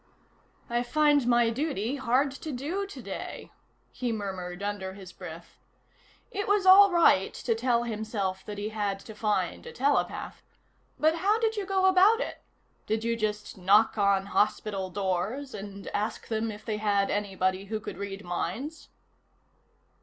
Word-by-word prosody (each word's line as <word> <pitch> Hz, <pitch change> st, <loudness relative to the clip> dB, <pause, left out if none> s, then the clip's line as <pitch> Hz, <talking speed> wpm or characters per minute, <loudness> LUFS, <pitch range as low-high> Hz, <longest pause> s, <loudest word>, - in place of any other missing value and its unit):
"I 240 Hz, 0 st, 0 dB
find 290 Hz, 0 st, +3 dB
my 240 Hz, -1 st, +4 dB
duty 265 Hz, -2 st, -2 dB
hard 265 Hz, +2 st, +2 dB
to 300 Hz, +3 st, -7 dB
do 320 Hz, +10 st, -3 dB
today," 400 Hz, -, -7 dB, 0.4 s
he 245 Hz, -2 st, -2 dB
murmured 190 Hz, -3 st, -5 dB
under 200 Hz, -2 st, -3 dB
his 190 Hz, -2 st, -11 dB
breath. -, -, -10 dB, 0.7 s
It 405 Hz, -2 st, -3 dB
was 405 Hz, -1 st, +2 dB
all 390 Hz, +1 st, +9 dB
right 335 Hz, -, +4 dB
to 230 Hz, -, 0 dB
tell 235 Hz, +1 st, +1 dB
himself 210 Hz, -4 st, -3 dB
that 210 Hz, -1 st, -6 dB
he 205 Hz, +1 st, -3 dB
had 205 Hz, -2 st, -2 dB
to 220 Hz, -, -10 dB
find 210 Hz, 0 st, -1 dB
a -, -, -7 dB
telepath. 285 Hz, -, -1 dB, 0.6 s
But 315 Hz, +2 st, +3 dB
how 405 Hz, +5 st, +2 dB
did 450 Hz, -1 st, 0 dB
you 405 Hz, -3 st, -3 dB
go 385 Hz, -1 st, +2 dB
about 380 Hz, +4 st, +6 dB
it? -, -, -4 dB, 0.5 s
Did 220 Hz, +1 st, 0 dB
you 230 Hz, 0 st, +1 dB
just 210 Hz, -3 st, -3 dB
knock 205 Hz, +4 st, +4 dB
on 200 Hz, -2 st, +2 dB
hospital 200 Hz, -1 st, 0 dB
doors 200 Hz, +9 st, -2 dB
and 200 Hz, 0 st, -8 dB
ask 215 Hz, +2 st, -3 dB
them 225 Hz, 0 st, -1 dB
if 210 Hz, 0 st, -11 dB
they 215 Hz, -2 st, -2 dB
had 205 Hz, -2 st, +1 dB
anybody 190 Hz, -2 st, -1 dB
who 215 Hz, +2 st, -3 dB
could 195 Hz, -, -8 dB
read 200 Hz, 0 st, -5 dB
minds? 190 Hz, -, -4 dB
220 Hz, 155 wpm, -28 LUFS, 200-285 Hz, 0.7 s, all